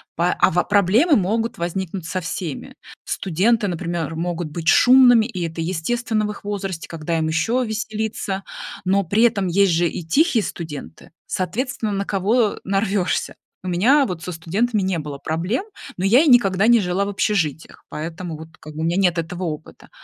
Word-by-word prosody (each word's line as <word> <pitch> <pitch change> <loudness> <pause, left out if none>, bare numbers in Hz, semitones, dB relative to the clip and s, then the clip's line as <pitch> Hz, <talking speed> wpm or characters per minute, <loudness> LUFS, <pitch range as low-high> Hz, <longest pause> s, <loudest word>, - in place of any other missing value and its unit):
Па 175 +2 +1
а, - - +5
ва 175 +2 +1
проблемы 210 - +3
могут 225 +1 0
возникнуть 175 +1 -3
со 185 0 -3
всеми. 165 -3 -5 0.3
Студенты, 205 +5 +1
например, 170 -2 -3
могут 170 0 -3
быть 165 +1 -6
шумными 245 +1 +6
и 180 -8 -4
это 165 0 -5
естественно 215 +6 -1
в 210 - -2
их 205 - -11
возрасте, 195 -4 -4
когда 165 0 -3
им 160 - 0
еще 165 +11 +1
веселиться? 220 -3 -3 0.4
Но 195 +2 +2
при 200 +6 +1
этом 210 -5 +3
есть 185 0 +3
же 170 +1 +2
и 170 - -5
тихие 245 - +2
студенты, 160 -4 -8 0.2
соответственно, 220 +4 -2
на 200 0 -2
кого 210 +3 +1
нарвешься. 195 -1 -1 0.3
У - - -6
меня 240 +12 +4
вот 180 -7 -5
со 180 - -5
студентами 195 +6 -1
не 185 -3 -1
было 145 -2 -6
проблем, 170 - -2 0.3
но 185 - -1
я 235 +9 +6
и 325 - +2
никогда 205 -5 +4
не 235 -1 +6
жила 180 +1 0
в 200 - -3
общежитиях, 180 -7 -2
поэтому 165 +1 -6
вот 160 +1 -10
как 155 0 -11
бы 155 - -4
у - - -1
меня 170 +2 0
нет 180 -3 +2
этого 165 +2 -4
опыта. 155 -1 -7
190 Hz, 180 wpm, -21 LUFS, 165-215 Hz, 0.4 s, шумными